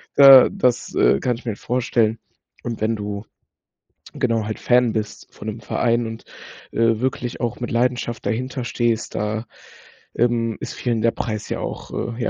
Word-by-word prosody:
da 135 -2 +9
das, 125 -12 0
äh, 65 +2 +4
kann 125 - -1
ich 125 - -15
mir 115 - -1
halt 100 - -8
vorstellen 115 -2 0 0.4
und 115 -2 -5
wenn 115 +1 +1
du, 105 0 -5 0.9
genau, 115 -3 0
halt 110 0 -4
Fan 125 -2 +3
bist 110 -1 -4
von 105 - -9
'nem 110 - -6
Verein 120 -1 0
und, 110 0 -8 0.5
äh, 115 -1 +2
wirklich 125 -2 -2
auch 120 -2 -2
mit 120 - -4
Leidenschaft 120 -1 -1
dahinter 130 +3 -2
stehst, 120 -2 -1
da, 110 +2 -2 0.7
ähm, 115 -2 +1
ist - - -5
vielen 120 -3 -1
der 115 +1 +3
Preis 110 -3 -4
ja - - -2
auch - - -6 0.3
ja, 115 - -1
115 Hz, 170 wpm, -21 LUFS, 110-125 Hz, 0.9 s, da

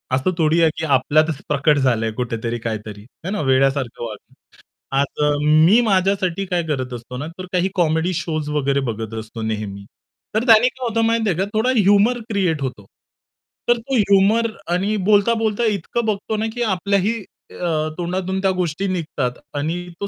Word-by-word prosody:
असं 135 +8 +1
थोडी 160 +1 +3
आहे, 165 - +5
की 160 - -2
आपल्यातच 150 +2 +2
प्रकट 150 +1 +2
झालंय 115 -5 +1
कुठेतरी 120 -1 -2
काहीतरी, 110 -2 -5 0.2
है 190 - -2
ना, 210 - -2
वेड्यासारखं 135 -3 +1
वागलं. 110 - -10 0.6
आज 140 +1 0
अ, 150 - +3
मी 160 +9 +6
माझ्यासाठी 195 -3 +1
काय 180 -2 -1
करत 130 -4 -2
असतो 120 +1 -7
ना, 145 - -4
तर 185 - -6
काही 180 +1 +2
कॉमेडी 165 0 +1
शोज 155 -3 -3
वगैरे 140 -2 +1
बघत 110 0 -6
असतो 110 +1 -8
नेहमी. 105 -2 -4 0.5
तर 220 - +2
त्याने 230 +2 +7
काय 255 0 -5
होतं 230 0 0
माहिती 225 -1 +1
आहे 175 - 0
का 190 - +1
थोडा 220 +4 +1
ह्युमर 205 +4 +4
क्रिएट 185 -8 0
होतो. 125 -7 -5 0.8
तर 240 - +5
तो 260 +4 -3
ह्युमर 205 +1 +4 0.3
आणि 195 +4 0
बोलता-बोलता 220 +1 +2
इतकं 210 +4 -2
बघतो 215 0 -2
ना, 215 - -1
की 245 - -5
आपल्याही 200 +2 0 0.3
अ, 155 -3 -1
तोंडातून 185 +2 -2
त्या 195 - +2
गोष्टी 180 +2 -1
निघतात 155 -9 -2 0.2
आणि 155 +4 -1 0.3
तो 200 - -1
170 Hz, 170 wpm, -20 LUFS, 135-200 Hz, 0.8 s, त्याने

